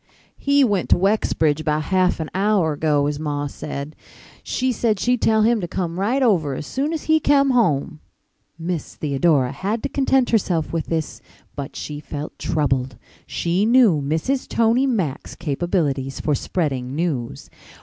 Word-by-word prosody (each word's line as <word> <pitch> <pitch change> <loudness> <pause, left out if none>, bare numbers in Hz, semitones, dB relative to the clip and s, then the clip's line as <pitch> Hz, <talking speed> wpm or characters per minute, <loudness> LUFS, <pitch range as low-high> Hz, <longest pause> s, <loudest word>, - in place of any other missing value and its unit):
"He 280 0 +3
went 205 -7 +1
to - - +5
Wexbridge 175 -6 +1
about 155 0 0
half 185 +1 +1
an 160 - -4
hour 195 -5 +2
ago, 145 -1 +1
his 145 0 -2
ma 145 -2 -2
said. 140 +1 -6 0.5
She 260 0 -1
said 220 -3 0
she'd 245 +2 +1
tell 220 -1 +3
him 230 -1 +3
to 175 - -3
come 175 0 -3
right 245 +8 +1
over 165 - +2
as 150 - -6
soon 280 - -2
as 320 -2 -3
he 315 0 +3
kem 280 -2 +3
home." 160 - +1 0.6
Mrs. 165 -1 -4
Theodora 140 -2 +1
had 210 +4 -3
to - - -1
content 265 -2 +2
herself 180 -9 0
with 165 -2 -2
this, 160 -2 -3 0.3
but 140 -1 -6
she 150 -1 -6
felt 150 0 -7
troubled. 135 -6 -1 0.3
She 175 +3 0
knew 225 - +4
Mrs. 160 - -1
Tony 235 +4 +2
Mack's 190 - -2
capabilities 145 -4 -1
for 150 - 0
spreading 135 -5 -2
news. 140 -5 -3
170 Hz, 160 wpm, -21 LUFS, 145-225 Hz, 0.6 s, to